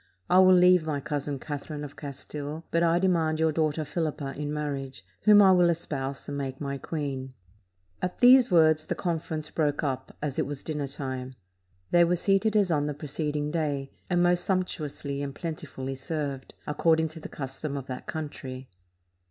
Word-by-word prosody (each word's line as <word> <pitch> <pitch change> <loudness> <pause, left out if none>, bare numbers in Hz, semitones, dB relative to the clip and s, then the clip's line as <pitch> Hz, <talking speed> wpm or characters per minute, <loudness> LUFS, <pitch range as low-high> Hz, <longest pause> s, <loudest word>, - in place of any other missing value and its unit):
I 180 - +7
will 185 0 +7
leave 180 -1 +6
my 155 -2 -2
cousin 145 -1 -3
Catherine 145 +1 -6
of 145 -1 -8
Castile; 145 +2 -6
but 165 - +2
I 170 0 +4
demand 165 -4 +2
your 160 0 +3
daughter 155 0 0
Philippa 145 -3 -3
in 145 0 -3
marriage, 140 -3 -4 0.2
whom 210 -1 +8
I 190 - +7
will 180 -2 +5
espouse 140 -5 -3
and 145 - -4
make 135 -1 -4
my 140 -1 -3
queen." 135 -4 -4 0.7
At 180 0 -2
these 255 0 +7
words 155 -3 +4
the - - -1
conference 160 -3 -3
broke 150 -2 0
up, 135 -3 -3
as 145 -3 -3
it - - 0
was 145 -1 -6
dinner 150 -3 -3
time. 130 -2 -5 0.6
They 175 0 +6
were 175 +1 +3
seated 195 +4 +2
as 200 -4 +3
on 145 -2 +1
the 150 - -3
preceding 150 0 -2
day, 145 -4 -2 0.2
and 175 -1 +3
most 175 0 +3
sumptuously 150 -6 -2
and 140 -1 -4
plentifully 155 -5 -5
served, 140 -1 -4
according 160 +2 +2
to 160 +1 -7
the - - -8
custom 140 +1 -5
of 135 - -5
that 130 -1 -7
country. 130 -4 -6
150 Hz, 175 wpm, -27 LUFS, 140-170 Hz, 0.7 s, whom